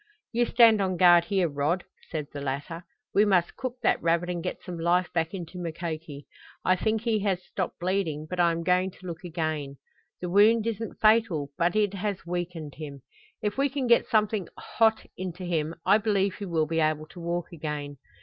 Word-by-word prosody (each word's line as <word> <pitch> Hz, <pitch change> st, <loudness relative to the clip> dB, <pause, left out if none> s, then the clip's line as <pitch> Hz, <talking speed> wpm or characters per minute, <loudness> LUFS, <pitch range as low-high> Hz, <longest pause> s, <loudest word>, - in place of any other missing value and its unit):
"You 240 Hz, 0 st, +1 dB
stand 225 Hz, -3 st, +6 dB
on 185 Hz, -2 st, 0 dB
guard 175 Hz, -1 st, +7 dB
here, 190 Hz, -2 st, +1 dB
Rod," 150 Hz, +5 st, -1 dB, 0.3 s
said 155 Hz, -3 st, -3 dB
the 145 Hz, -, -5 dB
latter. 145 Hz, +6 st, -4 dB, 0.3 s
"We 205 Hz, -, +5 dB
must 185 Hz, -5 st, +2 dB
cook 255 Hz, -2 st, -4 dB
that -, -, +2 dB
rabbit 170 Hz, +1 st, +1 dB
and 175 Hz, -1 st, -3 dB
get -, -, -5 dB
some 175 Hz, -2 st, -6 dB
life 175 Hz, +2 st, +1 dB
back 165 Hz, -1 st, 0 dB
into 180 Hz, -1 st, -7 dB
Mukoki. 160 Hz, -3 st, -5 dB, 0.4 s
I 185 Hz, -, +4 dB
think 220 Hz, +4 st, 0 dB
he 225 Hz, -2 st, +1 dB
has 195 Hz, -3 st, -1 dB
stopped 185 Hz, -3 st, -4 dB
bleeding, 175 Hz, -5 st, -1 dB
but 180 Hz, +3 st, -5 dB
I 170 Hz, -1 st, +5 dB
am 165 Hz, 0 st, -3 dB
going 180 Hz, +1 st, +2 dB
to 185 Hz, -, -16 dB
look 170 Hz, 0 st, -6 dB
again. 155 Hz, -5 st, -3 dB, 0.4 s
The 180 Hz, -, -4 dB
wound 210 Hz, +4 st, +5 dB
isn't 225 Hz, 0 st, -4 dB
fatal, 215 Hz, -10 st, +3 dB
but 170 Hz, +2 st, +1 dB
it 205 Hz, -2 st, +2 dB
has 200 Hz, -2 st, -3 dB
weakened 175 Hz, -4 st, -4 dB
him. 140 Hz, -4 st, -8 dB, 0.4 s
If 210 Hz, +4 st, -1 dB
we 280 Hz, +1 st, +3 dB
can 270 Hz, -1 st, -2 dB
get 235 Hz, -1 st, +4 dB
something 215 Hz, -4 st, +1 dB
hot 220 Hz, -1 st, +1 dB
into 185 Hz, 0 st, -5 dB
him 165 Hz, -2 st, -1 dB
I 200 Hz, +3 st, +5 dB
believe 200 Hz, -3 st, +1 dB
he 205 Hz, -, -5 dB
will 160 Hz, -3 st, +1 dB
be 165 Hz, +1 st, -1 dB
able 155 Hz, -1 st, +1 dB
to 180 Hz, -, -12 dB
walk 170 Hz, 0 st, -3 dB
again. 150 Hz, -3 st, -5 dB
175 Hz, 200 wpm, -27 LUFS, 165-205 Hz, 0.4 s, guard